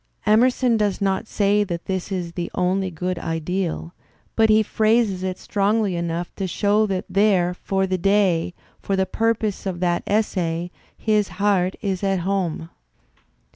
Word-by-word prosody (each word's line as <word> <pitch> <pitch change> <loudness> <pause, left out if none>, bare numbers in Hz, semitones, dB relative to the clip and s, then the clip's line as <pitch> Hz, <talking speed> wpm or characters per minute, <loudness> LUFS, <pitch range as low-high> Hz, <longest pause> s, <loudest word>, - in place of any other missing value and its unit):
Emerson 240 +2 +3
does 205 -3 0
not 195 +2 0
say 205 0 +2
that 175 -4 -5
this 190 +1 -3
is 180 -3 -3
the 170 0 -4
only 185 +1 0
good 180 +1 -3
ideal, 165 +1 -3 0.4
but 220 -1 +4
he 215 0 +5
phrases 215 -3 +1
it 185 -1 -3
strongly 205 -1 0
enough 170 0 -3
to 195 - -3
show 205 +4 +2
that 190 -2 -2
there, 195 -3 +2
for 190 +1 -1
the 185 -1 -1
day, 195 -3 +2 0.3
for 195 - -1
the 190 0 +1
pur 225 +4 +1
poses 210 -2 -3
of 180 -2 -3
that 175 -1 +1
essay, 175 -5 -1 0.3
his 210 -2 +1
heart 190 -2 +2
is 195 -2 -2
at 195 -2 +1
home. 175 -3 -2
190 Hz, 160 wpm, -22 LUFS, 180-210 Hz, 0.4 s, he